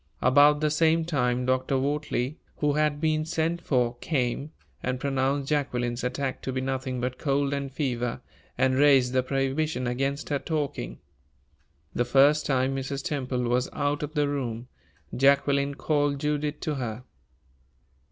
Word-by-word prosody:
About 145 +3 +5
the 155 -1 +2
same 160 +1 +3
time 125 -6 0
Dr. 130 +1 +1
Wortley, 140 0 -1 0.2
who 150 -1 +1
had 150 -1 +1
been 155 0 +1
sent 165 +1 -1
for, 125 -5 0
came, 140 +1 -2 0.3
and 125 0 -2
pronounced 135 0 0
Jacqueline's 125 -5 -1
attack 130 +1 -2
to 130 - -3
be 130 - -2
nothing 130 -1 -2
but 125 +1 -3
cold 140 -1 0
and 140 -1 -3
fever, 125 -4 -2 0.4
and 130 0 +3
raised 135 -2 +4
the 130 - +3
prohibition 135 +1 -1
against 135 +4 -2
her 145 -2 0
talking. 145 - -3 1.0
The 120 - +1
first 140 +4 +4
time 130 0 +1
Mrs. 135 +1 -4
Temple 130 -4 -2
was 125 +1 +1
out 145 0 -1
of 150 0 -5
the 145 -1 +2
room, 125 -4 -3 0.5
Jacqueline 140 +1 +3
called 145 -1 0
Judith 150 0 -1
to 155 - -1
her. 120 -2 -4
140 Hz, 150 wpm, -27 LUFS, 130-145 Hz, 1.0 s, About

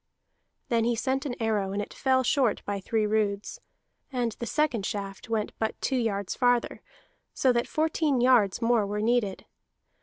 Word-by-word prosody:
Then 230 -1 +2
he 235 +1 +1
sent 265 +4 -1
an 245 - -4
arrow, 210 -4 0
and 200 - -2
it 205 - -5
fell 260 -1 +2
short 250 -3 +1
by 200 -1 -2
three 215 +2 0
roods; 210 -1 -1 0.5
and 245 -3 -1
the 235 - -4
second 295 -8 0
shaft 195 +1 -5
went 220 -2 -1
but 220 0 -2
two 270 - -1
yards 205 -6 -1
farther, 245 -1 +1 0.5
so 260 -2 +3
that 235 0 0
fourteen 310 -3 +1
yards 240 -4 +3
more 230 -3 +3
were 205 +1 -3
needed. 220 -4 0
230 Hz, 170 wpm, -27 LUFS, 205-250 Hz, 0.5 s, so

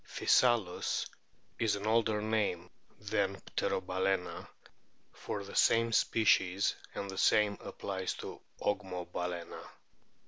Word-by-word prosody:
Physalus 115 -8 +2 0.5
is 110 -3 +2
an 100 +1 -6
older 110 -1 +2
name 105 -5 -1 0.3
than - - -1 0.2
Pterobalcsna 95 0 -1 0.7
for 100 - -5
the 100 - -10
same 115 0 +4
species, 100 -4 +3 0.2
and 100 - -3
the 95 -1 -5
same 105 -1 +4
applies 95 -1 -4
to - - -8 0.2
Ogmobalana. 90 -3 -3
100 Hz, 100 wpm, -32 LUFS, 95-110 Hz, 0.7 s, same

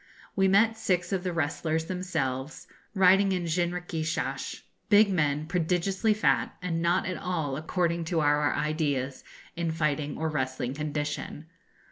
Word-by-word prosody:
We 195 -1 +3
met 225 +4 +4
six 180 -2 0
of 185 -2 -1
the 180 - -1
wrestlers 160 0 -1
themselves, 150 -7 -3 0.3
riding 195 +1 +5
in 180 -1 -1
jinrikishas 165 -5 -2 0.3
big 205 -1 +6
men, 150 -4 +1
prodigiously 180 +5 +1
fat, 215 - +1
and 165 -3 -2
not 170 +2 +2
at 185 -2 -3
all, 160 -7 -2
according 170 +2 -1
to 165 0 0
our 145 -1 +3
ideas, 145 -3 -1 0.3
in 170 -1 -1
fighting 150 -2 -1
or 160 - -1
wrestling 130 -4 -2
condition. 150 +1 -4
165 Hz, 135 wpm, -28 LUFS, 150-180 Hz, 0.3 s, big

